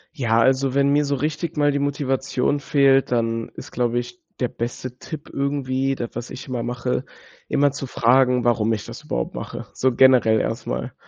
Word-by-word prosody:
Ja 115 -5 +2
also, 135 +1 +2
wenn 140 0 +3
mir 145 +1 +3
so 140 0 0
richtig 155 +3 -3
mal 145 0 +3
die 140 - -1
Motivation 135 0 0
fehlt, 135 -2 +3
dann 115 -1 0
ist, - - -9
glaube 120 -1 0
ich, 120 0 -5 0.2
der 125 - +1
beste 120 +2 -5
Tipp 155 -2 -8
irgendwie 135 -1 -1
das 120 -2 -5
was 120 +1 -6
ich 135 - -8
immer 125 -2 -3
mache, 125 +1 -2 0.4
immer 145 0 +2
zu 140 -1 -6
fragen, 125 0 +3
warum 115 -2 +2
ich 105 - -4
das - - -9
überhaupt - - -3
mache, - - -6
so 130 0 +1
generell 125 -4 +5
erstmal. - - -3
130 Hz, 185 wpm, -22 LUFS, 120-140 Hz, 0.4 s, generell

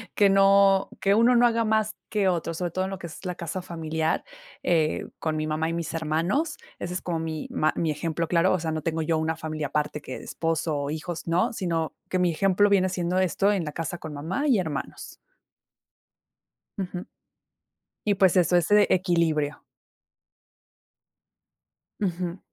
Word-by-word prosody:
que 200 -1 +5
no 195 0 +5
que 200 +1 +3
uno 235 +3 +5
no 240 0 +6
haga 230 -1 +1
más 215 0 +1
que 205 -3 +1
otro, 170 -2 0
sobre 175 +1 -3
todo 185 +3 -1
en - - -4
lo 195 - -4
que 175 - -6
es 165 - -11
la 180 -1 -3
casa 170 +2 -4
familiar. 160 -2 -2 0.4
Eh, 160 -3 +1
con 160 -1 -1
mi 155 0 -1
mamá 155 +1 -1
y - - -2
mis 170 -1 -3
hermanos, 165 - 0 0.2
ese 175 - -4
es 185 - -3
como 170 -2 -2
mi 160 -1 -4
ma 155 - +2
mi 165 - 0
ejemplo 165 +2 -2
claro. 170 +2 +3
O 185 - +1
sea, 160 0 -2
no 155 0 -2
tengo 160 +1 -1
yo 160 0 +1
una 160 +1 0
familia 155 -2 -3
aparte 150 +1 -2
que 130 - -7
esposo 165 -1 -2
o 140 0 -2
hijos, 160 +2 -5
¿no?, 170 +6 +1
sino 165 -6 -2 0.2
que 185 - 0
mi 180 -1 +3
ejemplo 195 +4 +3
viene 190 -2 +3
siendo 180 0 -1
esto 190 +2 +2
en 195 -4 0
la 150 - -4
casa 165 +3 -4
con 160 -3 -8
mamá 170 - -2
y 250 -7 +4
hermanos. 155 -6 -5 1.6
Ujú. 180 -2 -4 1.0
Y 205 - +4
pues, 190 -2 +4
eso 180 0 +4
es 175 -1 +2
e 210 0 +6
equilibrio. 170 -5 +1 2.3
Ujú. 180 -2 -2
170 Hz, 180 wpm, -26 LUFS, 160-190 Hz, 2.3 s, no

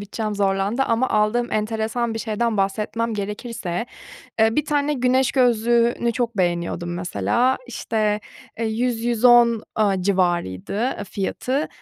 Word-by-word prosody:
bütçem 210 +1 -4
zorlandı 200 +4 +1
ama 245 0 +1
aldığım 215 +3 +1
enteresan 220 +2 -1
bir - - -3
şeyden 225 0 -1
bahsetmem 215 +3 -1
gerekirse, 210 -1 -4 0.5
eee, 220 +1 +4
bir 300 - +1
tane 295 0 +1
güneş 255 0 +2
gözlüğünü 235 -1 +2
çok 235 -2 -2
beğeniyordum 175 -1 -1
mesela. 175 - 0
İşte, 210 -2 -1 0.4
eee, 230 - 0
100-110 235 0 +3
aaa, 200 -3 +1
civarıydı, 175 - 0 0.2
eee, 205 - -4
fiyatı. 255 +9 -2
220 Hz, 120 wpm, -22 LUFS, 200-240 Hz, 0.5 s, eee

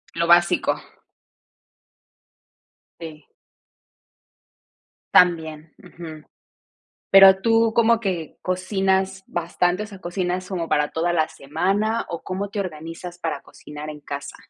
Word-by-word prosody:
Lo 170 0 0
básico. 175 0 +4 2.3
Sí. 155 -2 -9 1.9
También, 160 -3 +2
ujú. 160 -2 -11 0.9
Pero, 195 0 +8
¿tú 225 0 +3
como 230 0 +4
que 180 -8 -4
cocinas 190 +1 -1
bastante, 175 +3 -1
o - - -8
sea, 200 -3 -12
cocinas 180 0 -3
como 175 -4 -4
para 150 0 +1
toda 170 +2 0
la 160 -2 +1
semana, 200 +10 -1
o 170 - -5
cómo 195 +2 -4
te 205 - -5
organizas 170 0 -6
para 165 -3 -3
cocinar 150 +1 -10
en 150 -1 -8
casa? 140 -1 -7
175 Hz, 110 wpm, -22 LUFS, 160-195 Hz, 2.3 s, Pero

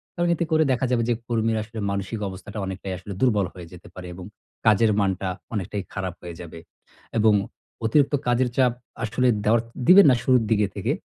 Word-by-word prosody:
কারণ 175 0 0
এতে 170 - -1
করে 160 0 +4
দেখা 130 +1 +1
যাবে 120 -2 +2
যে - - +4
কর্মীরা 115 -1 0
আসলে 110 +1 -9
মানসিক 100 +3 -3
অবস্থাটা 100 +3 -8
অনেকটাই 95 0 -5
আসলে 95 +2 -8
দুর্বল 105 -7 +3
হয়ে 90 -2 -10
যেতে 90 - -13
পারে 90 -1 -8
এবং 90 0 -9 0.4
কাজের 110 +1 +4
মানটা 95 -1 0 0.3
অনেকটাই 100 -1 -3
খারাপ 95 -3 -3
হয়ে 85 -1 -8
যাবে 85 -1 -9 0.6
এবং 110 -1 +5 0.5
অতিরিক্ত 140 +6 +3
কাজের 125 +1 +2
চাপ 130 -2 +4 0.3
আসলে 120 +4 +1 0.2
দেওয়ার 110 +2 +3 0.3
দিবেন 195 +2 +9
না - - +4
শুরুর 125 -3 +4
দিকে 105 -2 +3
থেকে - - -1
110 Hz, 185 wpm, -24 LUFS, 95-120 Hz, 0.6 s, দিবেন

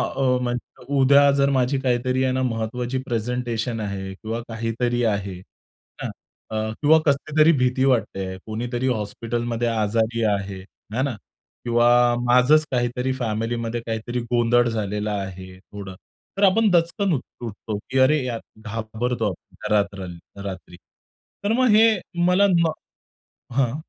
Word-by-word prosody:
अ, 135 - -2 0.2
म्हणजे 120 -1 -5
उद्या 140 +1 +6
जर 140 0 +2
माझी 130 0 +1
काहीतरी 130 0 +1
आहे 130 - +1
ना 130 - 0
महत्वाची 120 +2 -2
प्रेझेंटेशन 120 0 -2
आहे 95 -2 -4
किंवा 110 +4 -5
काहीतरी 115 +2 -1
आहे. 100 -3 0 0.7
आहे - - -2
ना? 110 0 -7
अ, - - -3
किंवा 160 +2 +6
कसली 150 +1 0
तरी 160 +2 +7
भीती 125 +1 +2
वाटते 115 -7 +1
आहे. 95 0 -6
कुणीतरी 120 +3 -3
हॉस्पिटलमध्ये 120 +1 -2
आजारी 115 +1 0
आहे, 100 -2 -1 0.3
आहे 130 - 0
ना? 135 -5 -1 0.5
किंवा 120 0 +3 0.4
माझचं 125 +5 +6
काहीतरी 125 +1 0
फॅमिलीमध्ये 115 0 -2
काहीतरी 115 +2 -3
गोंधळ 120 0 +3
झालेलं 105 -1 -2
आहे 95 -2 -6
थोडं. 100 -1 -9 0.4
तर 200 - +1
आपण 210 +3 +5
दचकन 175 +2 +2
उठतो 115 -5 -5
की 130 +1 +1
अरे 135 +1 +4
यार, 120 -2 -3 0.3
घाबरतो 115 +2 -2
आपण, 90 - -11
घरात 100 -1 +2
राहायला 95 +1 -9
रात्री. 95 -2 -7 0.7
तर 205 - +1
मग 255 +2 +3
हे 220 0 +6 0.3
मला 185 +3 +5
म 165 -1 +2 0.8
हां. 130 -1 +1
120 Hz, 140 wpm, -23 LUFS, 110-130 Hz, 0.8 s, तरी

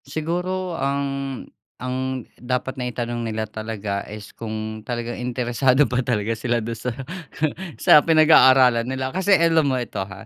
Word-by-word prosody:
Siguro 180 +3 -3
ang 140 +1 0 0.8
ang 130 0 -3
dapat 125 +2 -3
na 125 -1 -2
itanong 120 0 -3
nila 110 -1 -2
talaga 110 -2 -4
is 105 0 -9
kung 110 -1 -5
talagang 120 -1 -4
interesado 125 +2 +2
pa 125 0 0
talaga 115 -2 0
sila 120 +1 0
dun 115 +1 -5
sa 125 +2 -3 0.8
sa 150 - +7
pinag-aaralan 130 -7 +6
nila 130 0 -2
kasi 190 +2 +2
alam 165 -3 +3
mo 130 - 0
ito 120 -5 -4
ha, 95 0 -8
125 Hz, 145 wpm, -22 LUFS, 115-135 Hz, 0.8 s, sa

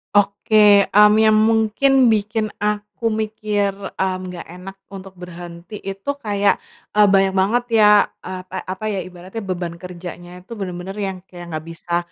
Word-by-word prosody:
Oke, 205 0 +4
mmm, 210 0 +6
yang 215 -1 +5
mungkin 225 +4 +3
bikin 215 0 0
aku 210 +2 -2
mikir, 215 -2 -1 0.2
mmm, 190 -1 -1 0.2
nggak 175 - -8
enak 190 +1 -9
untuk 195 -1 -10
berhenti 175 +1 -10
itu 195 +5 -6
kayak, 205 -6 +1 0.4
eee, 210 - +7
banyak 195 -1 +4
banget 215 +6 +2
ya, 210 -1 +7 0.3
eee, 185 0 -5
pa - - -6
apa 190 +4 -4
ya, 195 -4 -3
ibaratnya 185 +4 -9
beban 175 -2 -4
kerjanya 175 0 -9
tuh 230 - -7
bener-bener 190 0 -6
yang 195 -2 -3
kayak 175 -2 -10
nggak 155 0 -5
bisa 170 +1 -3
200 Hz, 155 wpm, -20 LUFS, 180-215 Hz, 0.4 s, eee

